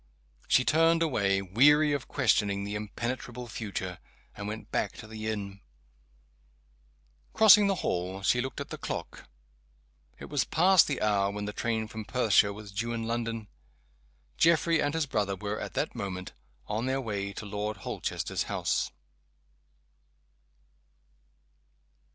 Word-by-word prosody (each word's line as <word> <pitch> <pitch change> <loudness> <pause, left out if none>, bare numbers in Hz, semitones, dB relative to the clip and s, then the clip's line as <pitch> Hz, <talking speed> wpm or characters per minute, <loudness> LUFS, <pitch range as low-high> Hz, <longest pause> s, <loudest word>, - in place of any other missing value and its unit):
She 130 - +4
turned 165 +1 +4
away, 100 -10 +1
weary 145 +10 +5
of 140 -3 -3
questioning 100 -1 +1
the 100 +1 -4
impenetrable 120 +3 -4
future, 100 -5 -5 0.4
and 100 - -6
went 110 +1 -7
back - - -1
to - - -10
the 110 0 -6
inn. 100 -2 -4 1.7
Crossing 210 -2 +7
the 195 - +2
hall 90 +2 -2
she 125 +5 +3
looked 130 0 -5
at - - -6
the - - -7
clock. - - -6 0.9
It - - -9
was 145 -5 0
past 180 +2 +5
the 140 -6 -2
hour 100 -2 +2
when 105 0 -4
the 105 - -4
train 110 -1 -1
from 110 0 -7
Perthshire 110 -4 +3
was 105 0 -9
due 115 +4 -2
in 115 -1 -3
London. 115 -1 -3 0.9
Geoffrey 165 0 +4
and 145 +1 0
his 160 -2 +1
brother 105 -7 -1
were, 105 +2 -4
at - - -6
that - - -1
moment, 95 -2 -5 0.3
on 110 +4 -2
their 135 +1 0
way 100 -5 -3
to 105 - -7
Lord 105 0 -3
Holchester's - - -3
house. - - 0
110 Hz, 140 wpm, -29 LUFS, 100-130 Hz, 1.7 s, Crossing